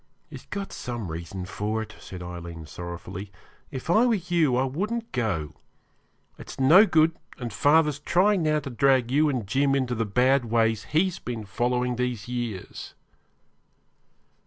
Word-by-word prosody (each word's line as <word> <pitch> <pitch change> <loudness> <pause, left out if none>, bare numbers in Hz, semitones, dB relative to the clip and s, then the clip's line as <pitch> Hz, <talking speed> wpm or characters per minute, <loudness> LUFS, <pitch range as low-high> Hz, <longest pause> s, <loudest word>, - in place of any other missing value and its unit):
'He's 135 -4 -10
got 200 -1 -5
some 120 -8 -5
reason 85 +3 -6
for 105 +3 -2
it,' - - -11
said 90 -2 -9
Aileen 85 -2 -7
sorrowfully. 85 +4 -7 0.4
'If 130 - -7
I 220 +9 +4
were 235 - +3
you 170 -8 +1
I 130 - +3
wouldn't 210 - -3
go. 90 - -2 0.9
It's - - -10
no 170 +11 +7
good, 160 -1 +3 0.2
and 120 -4 -5
father's 150 +1 +3
trying 185 +5 +2
now 155 -1 +2
to 140 -1 -7
drag 130 0 +3
you 150 +3 +3
and 125 -6 -2
Jim 135 +6 +2
into 130 -2 0
the 115 -1 -1
bad 125 +5 +3
ways 115 -1 +1
he's 175 +3 +1
been 115 -3 -5
following 125 +3 -1
these 125 -4 -2
years.' 120 -6 -5
125 Hz, 155 wpm, -26 LUFS, 105-155 Hz, 0.9 s, no